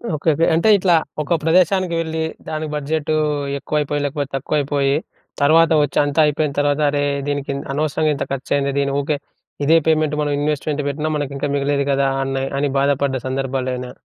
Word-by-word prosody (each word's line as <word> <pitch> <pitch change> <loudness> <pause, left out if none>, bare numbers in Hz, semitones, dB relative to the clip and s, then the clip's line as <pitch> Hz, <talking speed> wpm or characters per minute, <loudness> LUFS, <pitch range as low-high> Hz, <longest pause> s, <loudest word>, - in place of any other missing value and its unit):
Okay. 155 +2 0
Okay. 165 - +2
అంటే 170 +7 +3
ఇట్లా 180 -3 +3 0.3
ఒక 170 +3 0
ప్రదేశానికి 180 +1 +2
వెళ్ళి 160 0 -3 0.3
దానికి 155 -1 -4
బడ్జెటూ 155 +1 -1 0.4
ఎక్కువైపోయి, 145 0 -1
లేకపోతే 145 -1 -3
తక్కువైపోయీ 140 0 0 0.5
తర్వాత 160 +3 +5
వచ్చి 145 - -3
అంతా 145 +2 -1
అయిపోయిన 150 0 0
తర్వాత, 145 0 +1
"అరే! 145 0 0 0.2
దీనికి 145 -1 -2
ఇన్ 140 - -5
అనవసరంగా 155 +1 0
ఇంత - - -3
ఖర్చు 135 - -6
అయింది. 140 0 0
దీనికి 140 0 0
ఓకె, 145 +1 -1 0.5
ఇదే 160 +3 +5
పేమెంట్ 155 -1 +2
మనం 145 - 0
ఇన్వెస్ట్‌మెంట్ 150 0 -1
పెట్టినా 155 +2 -2
మనకింకా 145 0 -3
మిగిలేది 140 0 0
కదా!" 135 0 +2
అని 135 0 -2 0.2
అని 145 - +1
బాధపడ్డ 140 -1 +1
సందర్భాలేమైనా 130 -1 -3
145 Hz, 160 wpm, -20 LUFS, 140-155 Hz, 0.5 s, తర్వాత